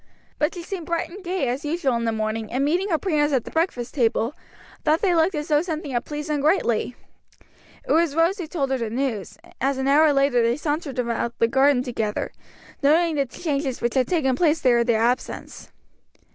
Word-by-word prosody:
But 300 +3 +1
she 345 - -6
seemed 350 -2 -6
bright 335 0 -2
and 390 +2 -10
gay 355 -6 -1
as 255 +5 -2
usual 300 -3 0
in 235 0 -1
the 225 - +1
morning, 220 0 -3
and 265 +3 0
meeting 360 +7 +1
her 325 - +2
parents 300 -5 +1
at 250 - +1
the - - -8
breakfast 285 -8 -1
table, 235 -1 +1 0.5
thought 310 +2 +2
they 370 -3 +3
looked 335 +2 +2
as 300 +1 -3
though 295 -1 +4
something 315 -3 -4
had 240 -1 -1
pleased 300 +1 -5
them 295 -2 0
greatly. 265 - +1 0.9
It - - -2
was 325 -3 +3
Rose 335 +5 +2
who 345 - -4
told 280 -5 -2
her 265 - 0
the 230 -2 -2
news, 235 -5 -3 0.2
as 270 +1 +1
an 265 0 -1
hour 300 +2 +5
later 275 -3 +3
they 235 +2 +1
sauntered 295 -2 -3
around 235 -1 -1
the 230 - +3
garden 265 +1 +3
together, 225 -4 -3 0.5
noting 320 +4 +3
the 280 -2 0
changes 275 -2 -3
which 235 0 -1
had 260 -2 +2
taken 275 -8 +1
place 320 +2 +2
there 245 -2 +3
in 235 - +1
their 225 -2 +2
absence. 245 +2 -3
280 Hz, 215 wpm, -23 LUFS, 245-320 Hz, 0.9 s, hour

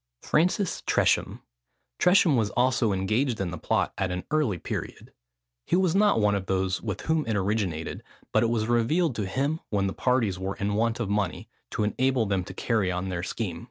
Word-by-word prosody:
FRANCIS 180 +4 +1
TRESHAM. - - +1 0.6
Tresham 180 -5 +5
was 110 -4 +1
also 120 -3 +2
engaged 110 +6 0
in 95 -3 -2
the 90 - -5
plot - - 0
at 95 -2 0
an 90 0 -3
early 150 -12 +1
period. - - -6 0.5
He - - +2
was 185 -2 +2
not 205 - +4
one 105 -1 +3
of 95 -2 -2
those 95 -1 0
with 105 -4 -4
whom 160 -1 +1
it 110 - 0
originated; 95 -5 -2 0.3
but - - +3
it 115 - +2
was 115 -2 0
revealed 120 +6 +1
to 105 -3 -2
him 140 +10 -1
when 100 -2 0
the 95 - -1
parties 115 -7 +1
were 95 +1 -3
in 100 +1 -2
want 115 +2 0
of 120 - -1
money, 100 -2 -2 0.2
to - - -2
enable 130 +3 +1
them 100 -2 0
to - - -8
carry 110 -6 0
on 90 +1 -3
their 90 -2 -3
scheme. 90 -2 -4
110 Hz, 195 wpm, -26 LUFS, 95-130 Hz, 0.6 s, Tresham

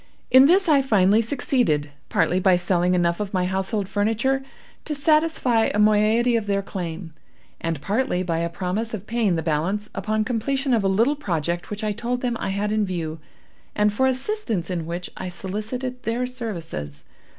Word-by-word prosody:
In 260 +2 +8
this 375 +3 +4
I 290 -4 +5
finally 210 -4 +4
succeeded—partly 180 - 0
by 185 -1 +4
selling 180 0 +1
enough 170 -1 +1
of 205 -1 -3
my 180 -1 +1
household 190 +2 -1
furniture 225 +7 0 0.4
to 300 - -2
satisfy 295 -6 +2
a - - -1
moiety 215 +3 +3
of 220 -3 -1
their 200 0 0
claim, 175 -3 -6 0.5
and 165 -3 -2
partly 205 - 0
by 165 -2 -1
a 170 0 -1
promise 195 +6 -2
of 200 -1 -9
paying 220 -5 +1
the 160 - -2
balance 175 +7 -1
upon 215 0 -1
completion 260 +4 -1
of 225 -4 +2
a - - +2
little 230 +9 +2
project 175 - -2
which 210 +1 -5
I 215 - 0
told 240 +4 -3
them 245 -2 -1
I - - -2
had 200 +2 -1
in 215 0 +1
view, 165 -4 -3 0.6
and 210 0 +2
for 265 +5 +2
assistance 260 - -2
in 170 -3 -3
which 175 +1 -5
I 185 - -4
solicited 220 +8 -5
their 240 +2 -1
services. 165 - -6
210 Hz, 175 wpm, -23 LUFS, 180-240 Hz, 0.6 s, In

